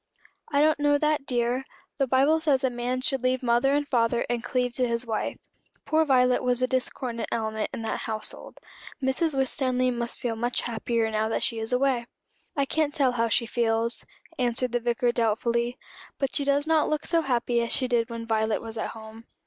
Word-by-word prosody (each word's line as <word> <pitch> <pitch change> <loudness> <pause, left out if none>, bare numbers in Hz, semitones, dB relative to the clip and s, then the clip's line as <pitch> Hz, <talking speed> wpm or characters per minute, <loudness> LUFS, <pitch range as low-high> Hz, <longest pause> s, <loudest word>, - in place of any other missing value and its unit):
"I 285 -1 +3
don't 305 0 +3
know 290 0 +3
that, 300 -1 0
dear. 245 +1 0 0.4
The 275 - +2
Bible 275 +5 +3
says 285 -5 +2
a 260 - +2
man 245 +1 -2
should 270 -1 0
leave 255 0 0
mother 240 +3 +3
and 290 0 0
father 235 -2 +1
and 240 -1 -1
cleave 250 -1 -1
to 250 -1 +2
his 235 +1 -1
wife. 220 -2 -2 0.5
Poor 315 0 +3
Violet 250 -3 +3
was 250 -1 +1
a 255 - +2
discordant 255 -2 -2
element 220 -1 -2
in 225 - -5
that 220 - -2
household. 215 -1 -4 0.4
Mrs. 275 +3 0
Winstanley 255 -1 +1
must 235 -1 -2
feel 235 -2 -2
much 240 +2 0
happier 230 -1 -1
now 220 +1 0
she 230 - 0
is 220 +2 -2
away." 250 -2 +1 0.5
"I 280 - +2
can't 300 +1 0
tell 275 -5 +3
how 230 -1 0
she 235 +2 +2
feels," 230 0 0 0.4
answered 245 0 +1
the 240 - +1
Vicar 240 +1 +1
doubtfully; 235 +2 0 0.4
"but 275 -1 -2
she 280 - +1
does 280 +1 +2
not 320 -1 +2
look 305 0 -1
so 335 -1 +2
happy 245 -4 0
as 235 - -2
she 255 - +1
did 235 -2 +1
when 230 -1 -5
Violet 220 -1 +1
was 225 0 -5
at - - -2
home." 220 +1 -11
245 Hz, 195 wpm, -26 LUFS, 230-270 Hz, 0.5 s, I